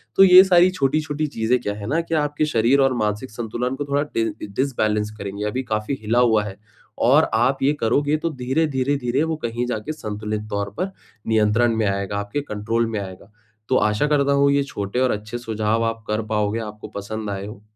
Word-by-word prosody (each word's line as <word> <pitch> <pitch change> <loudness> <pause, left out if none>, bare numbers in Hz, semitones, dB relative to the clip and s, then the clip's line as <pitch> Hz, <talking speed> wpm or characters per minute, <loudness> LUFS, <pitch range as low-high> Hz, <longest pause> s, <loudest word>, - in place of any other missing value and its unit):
तो 195 - +7
ये 185 0 +9
सारी 180 -1 +5
छोटी-छोटी 150 0 0
चीज़ें 120 -2 0
क्या 105 - -2
है 105 0 -7
ना 155 +6 +1
कि 165 0 -3
आपके 150 0 0
शरीर 125 0 +2
और 135 -1 +3
मानसिक 105 +3 -2
संतुलन 120 +3 -3
को 145 +1 -4
थोड़ा 140 0 0
डि 115 - +2 0.3
डिसबैलेंस 110 -6 0
करेंगे 100 +1 -5
अभी 130 +5 -2
काफ़ी 110 +3 -2
हिला 115 +3 +1
हुआ 110 -4 +4
है। 100 -2 -7 0.5
और - - +5
आप 135 +1 +2
ये 145 +2 +3
करोगे 145 +7 +2
तो 165 +2 -2
धीरे-धीरे-धीरे 135 -1 0
वो 160 0 -1
कहीं 120 +1 -2
जाके 125 +6 -3
संतुलित 105 -3 -5
तौर 100 0 -2
पर 185 +3 -2 0.4
नियंत्रण 110 +1 +3
में 110 -2 +1
आएगा, 100 0 -2
आपके 105 +8 -3
कंट्रोल 115 -1 -1
में 110 -2 -2
आएगा। 95 +1 -10 0.4
तो 130 - +3
आशा 105 +7 +2
करता 140 -1 +2
हूँ, 140 0 +4
ये 140 0 +2
छोटे 115 -3 -4
और 130 -1 +2
अच्छे 105 +3 -4
सुझाव 110 -1 -1
आप 115 0 -3
कर 105 +1 0
पाओगे, 105 +1 0
आपको 105 -1 -7
पसंद 105 +1 -5
आए 100 0 -4
हो। 105 0 -10
115 Hz, 200 wpm, -22 LUFS, 105-140 Hz, 0.5 s, ये